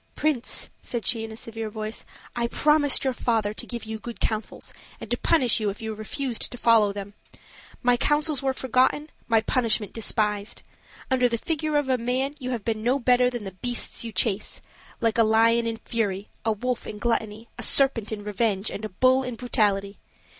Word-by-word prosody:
"Prince," 285 -5 -1
said 235 -3 -3
she, 225 -2 +2
in 225 - -6
a - - -8
severe 225 -1 -5
voice, 215 +1 -5 0.3
"I 235 0 0
promised 300 +2 +3
your 265 -1 +1
father 220 -4 0
to - - -8
give 235 -2 -5
you 220 0 -5
good 235 +1 -8
counsels 215 -1 -3 0.3
and - - -9
to - - +3
punish 260 -10 +4
you 215 -2 0
if 200 - -6
you 220 -1 -4
refused 230 +3 -2
to 245 - -7
follow 225 -3 +4
them. 200 0 -7 0.7
My 245 0 +4
counsels 295 +1 +1
were 270 -1 +1
forgotten, 260 +4 +1 0.2
my 225 -2 +4
punishment 225 -3 +1
despised. 210 -2 0 0.5
Under 250 -1 +4
the 235 - 0
figure 310 +3 -1
of 290 -2 0
a 260 -1 +1
man, 255 +4 -1
you 255 -2 -4
have 235 -5 -3
been 220 -2 -1
no 245 +4 +2
better 250 -1 +4
than 240 -3 -5
the 195 - -6
beasts 240 +7 -3
you 230 - -5
chase: 200 +1 0 0.4
like 230 0 +1
a - - +7
lion 230 +1 +4
in 225 0 -2
fury, 205 -4 -2 0.2
a 225 - +2
wolf 245 +3 -2
in 210 - -6
gluttony, 220 0 -2
a - - -3
serpent 255 -6 +4
in 210 -1 -4
revenge, 210 -1 0
and 210 - -6
a 215 - -3
bull 255 +7 +3
in 250 -2 -4
brutality. 205 -4 0
230 Hz, 195 wpm, -25 LUFS, 215-250 Hz, 0.7 s, a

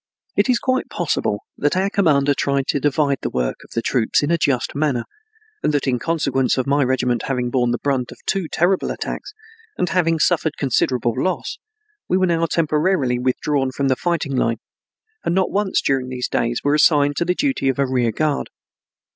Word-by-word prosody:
It - - +2
is 250 - +4
quite 255 +1 -1
possible - - -1 0.2
that 145 +5 +1
our 190 +1 +2
commander 145 -8 +3
tried 140 -1 0
to - - +1
divide 145 -1 +1
the - - -2
work 60 -1 -2
of - - -18
the 115 - -1
troops 120 +2 +1
in 145 - 0
a 170 - +3
just 130 -5 0
manner, 140 -5 0 0.6
and - - +1
that 145 - 0
in 125 -3 0
consequence 140 -6 0
of 130 - 0
my 140 +1 +2
regiment 125 -2 0
having 125 -2 -1
borne 125 -2 +1
the 120 - 0
brunt 130 -3 -1
of - - -11
two 190 -4 -1
terrible 180 +3 +1
attacks, 415 - -5 0.4
and 180 - 0
having 165 -3 +2
suffered 160 -1 +1
considerable 125 -3 +1
loss, 185 +8 -2 0.5
we 185 - +3
were 185 - +3
now 165 -2 +1
temporarily 155 -5 +1
withdrawn 130 +2 0
from 135 +1 -1
the 130 - +3
fighting 160 -3 -1
line, 115 -2 +1 0.7
and 170 - 0
not 190 -1 +1
once 200 -1 +1
during 130 -2 0
these 125 -1 -3
days 120 0 -1
were 145 - +2
assigned 145 -1 +4
to 170 - +1
the 180 +1 +1
duty 270 - 0
of 135 - -1
a 140 - +2
rear 125 -3 +1
guard. 150 +5 -1
140 Hz, 195 wpm, -20 LUFS, 130-165 Hz, 0.7 s, is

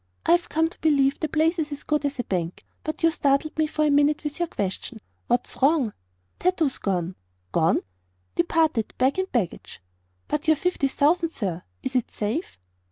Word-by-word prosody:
I've 345 +1 +3
come 320 +1 +2
to 330 - -13
believe 280 -3 +3
the 315 - 0
place 320 +3 +2
is 305 -1 -2
as 290 0 -6
good 300 -1 0
as 285 -1 -1
a 245 - -1
bank; 175 -4 -3 0.2
but 310 +1 -4
you 330 - +6
startled 285 0 +1
me 310 0 +2
for 305 0 0
a 295 - +3
minute, 290 +1 +3
with 295 +2 -4
your 345 - +1
question. 205 - -4 0.3
What's 245 +2 -1
wrong?" 275 -6 +3 0.5
"Tato's 340 -7 +1
gone." 180 -2 -1 0.4
"Gone!" 165 0 +3 0.5
"Departed 320 -9 +1
bag 265 +7 +2
and 375 0 -2
baggage." 210 -9 -2 0.5
"But 300 +2 -2
your 315 -1 +5
fifty 360 -5 +1
thousand, 320 +5 +2
sir. 185 - -3 0.2
Is 260 - -4
it 250 - +1
safe?" 220 - -3
290 Hz, 180 wpm, -25 LUFS, 245-320 Hz, 0.5 s, you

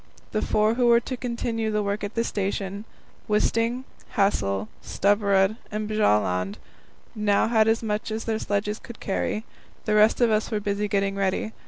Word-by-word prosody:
The 215 - 0
four 215 +1 +2
who 245 0 +2
were 235 0 +6
to 255 - -4
continue 235 -2 -2
the 210 -1 0
work 200 +1 -2
at 205 +2 -4
the 230 - +1
station 200 -1 -3 0.4
Wisting, 230 +4 +1 0.3
Hassel, 100 - +1
Stubberud, 200 0 +2
and 210 0 -3
Bjaaland 105 - +1 0.6
now 210 -2 +2
had 220 -1 +3
as 225 +1 +2
much 215 0 -2
as 220 +1 -3
their 220 -1 -1
sledges 210 +1 -1
could 235 - -11
carry. 210 +2 -2 0.4
The 215 - +1
rest 215 +1 +5
of 240 -2 +4
us 215 0 +1
were 215 - -1
busy 205 0 -1
getting 195 -1 0
ready. 195 +3 -1
210 Hz, 170 wpm, -25 LUFS, 200-225 Hz, 0.6 s, were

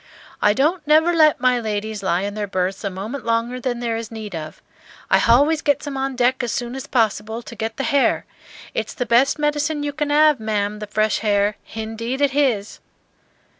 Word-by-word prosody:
"I 210 - +4
don't 300 - 0
never 320 +3 +4
let 310 -3 +4
my 250 -1 +3
ladies 215 -1 -3
lie 180 -2 0
in 200 +1 -3
their 210 -1 -3
berths 190 +1 -2
a 200 - -1
moment 210 +8 -6
longer 230 +2 -1
than 245 -1 -2
there 230 -1 -1
is 225 -1 -5
need 220 -3 -7
of. 155 -2 -7 0.5
I - - +6
h'always 290 +7 +4
gets 285 0 +1
them 285 -2 -5
on 270 0 -2
deck 250 +1 +2
as 240 -2 -2
soon 245 0 -3
as 270 +1 -6
possible 220 -1 0
to 235 - -10
get 225 0 -4
the 270 - -2
h'air. 285 -2 +2 0.5
It's - - -3
the 245 - -2
best 245 +5 +3
medicine 295 0 0
you 290 0 -3
can 295 0 -2
'ave, 300 -5 +4
ma'am, 210 -1 -1
the 210 - -6
fresh 215 +1 +1
h'air; 205 -1 +1 0.2
h'indeed 225 +3 -4
it 285 -1 +2
h'is." 250 -8 0
235 Hz, 205 wpm, -21 LUFS, 215-280 Hz, 0.5 s, I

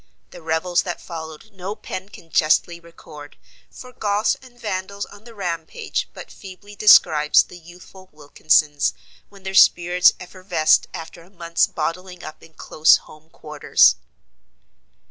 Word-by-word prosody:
The - - -12
revels 165 +2 0
that 175 -2 -6
followed 160 +3 -10
no 190 +2 -7
pen 195 -2 -8
can 165 -5 -16
justly 170 +2 +1
record, 150 -3 -14 0.3
for 250 0 -13
Goths 210 +2 0
and 250 -2 -18
Vandals 200 -2 -5
on 205 +2 -17
the 235 -1 -14
rampage 180 - -4
but - - -11
feebly 200 +1 -13
describes 155 -8 +5
the 180 - -14
youthful 180 +2 -16
Wilkinses 150 -1 0 0.3
when 200 -1 -18
their 190 0 -6
spirits 175 -1 +4
effervesced 180 -3 0
after 165 +1 -10
a 170 - -19
month's 170 -3 -1
bottling 180 +3 -5
up 155 - -10
in 160 - -18
close 155 +1 +3
home 155 +1 -18
quarters. 150 -2 +2
175 Hz, 140 wpm, -21 LUFS, 160-195 Hz, 0.3 s, describes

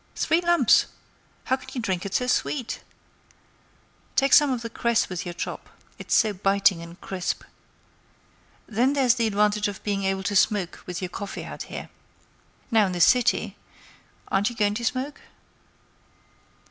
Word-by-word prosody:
Three 330 +2 +2
lumps! 340 -9 +4 0.6
How 260 - +1
can 260 0 -13
you 255 - -3
drink 190 -4 -2
it 195 - -5
so 250 - +1
sweet? 250 0 -1 1.3
Take 275 -1 +3
some 295 -1 +7
of 250 -3 -2
the 230 - -4
cress 235 -1 +1
with 180 -2 -4
your 175 - -5
chop; - - -6 0.3
it's - - -1
so 215 -1 +3
biting 195 -2 +2
and 170 +1 -11
crisp. 185 -2 -3 1.2
Then 240 +5 +1
there's 265 -4 +4
the 235 -3 0
advantage 210 0 +2
of 200 -1 -7
being 200 -1 -1
able 190 0 -1
to 205 - -2
smoke 195 -2 +2
with 180 +1 -5
your 180 - -3
coffee 200 +2 -6
out - - -8
here. - - -6 0.8
Now, 220 -3 +4
in 185 - -3
the 175 - -3
city—aren't 205 -2 0
you 240 - -9
going 205 -2 +1
to 235 +2 -3
smoke?" 260 +4 -3
210 Hz, 160 wpm, -25 LUFS, 195-250 Hz, 1.3 s, some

